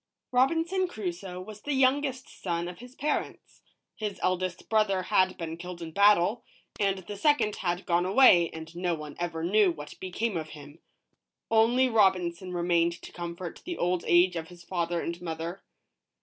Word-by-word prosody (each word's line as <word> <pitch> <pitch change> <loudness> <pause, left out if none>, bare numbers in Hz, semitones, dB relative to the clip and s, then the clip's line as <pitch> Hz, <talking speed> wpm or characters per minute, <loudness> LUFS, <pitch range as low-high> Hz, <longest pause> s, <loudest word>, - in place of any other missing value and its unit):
ROBINSON 330 +9 +2
CRUSOE 185 - -5
was 210 +3 -9
the 290 - -2
youngest 265 0 +1
son 170 -2 -2
of 180 - -8
his 245 +2 -12
parents. 300 +1 -3 0.3
His 210 -4 -4
eldest 185 -1 -1
brother 210 -4 +2
had 185 0 +2
been 165 -1 -5
killed 180 0 -8
in 165 -1 -7
battle, 205 +4 +4 0.4
and 195 -1 +1
the 190 +2 -8
second 215 -2 +2
had 175 0 -2
gone 175 0 +1
away 190 -5 +6
and 160 +1 -9
no 175 -1 0
one 150 -2 -8
ever 170 -2 -3
knew 200 +3 +4
what 150 -3 -9
became 190 +2 -2
of 155 -1 -5
him; 145 +2 -13 0.7
only 235 +4 +4
Robinson 185 -5 +2
remained 170 -1 +1
to - - -9
comfort 175 0 -6
the 350 -1 -5
old 180 0 0
age 175 +1 +5
of 165 -1 -4
his 175 0 -14
father 170 -1 -2
and 170 +1 -5
mother. 165 +2 -5
180 Hz, 165 wpm, -28 LUFS, 170-215 Hz, 0.7 s, away